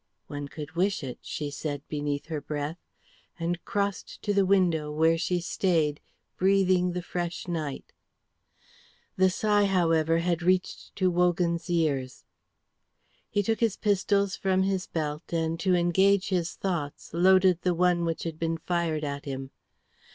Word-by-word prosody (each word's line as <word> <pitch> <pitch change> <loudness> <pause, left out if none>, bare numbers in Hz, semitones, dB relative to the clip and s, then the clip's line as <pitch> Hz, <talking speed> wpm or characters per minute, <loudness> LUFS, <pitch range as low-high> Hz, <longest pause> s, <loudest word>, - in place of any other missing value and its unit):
"One 145 0 -6
could 150 +1 -8
wish 185 +1 0
it," 125 -2 -6
she 145 -1 -4
said 145 0 -5
beneath 145 -1 -3
her 155 -2 -4
breath, 150 +3 -4 0.6
and 170 +1 -2
crossed 200 -1 -2
to 205 - 0
the 200 -1 +3
window 170 -6 +2
where 160 +2 +3
she 175 +2 0
stayed, 165 -4 0 0.4
breathing 185 -2 +3
the 180 0 -3
fresh 175 0 -4
night. 155 -5 -4 1.2
The 190 0 +4
sigh, 205 +2 +2
however, 165 -4 +2
had 170 0 0
reached 185 +1 0
to 185 -2 +2
Wogan's 175 -1 +1
ears. 145 -7 -1 1.0
He 205 0 +1
took 225 +2 0
his 225 -4 +1
pistols 200 -1 +1
from 190 -1 +1
his 190 -1 -1
belt, 150 -1 -4
and 165 -1 -1
to 185 0 +2
engage 190 +3 +3
his 175 -3 -1
thoughts, 170 -7 -4
loaded 185 0 +4
the 180 -1 +1
one 175 0 +2
which 165 -1 -2
had 160 -2 -5
been 165 0 -1
fired 165 -2 -1
at 140 -1 -4
him. 135 -1 -5
175 Hz, 150 wpm, -27 LUFS, 155-185 Hz, 1.2 s, The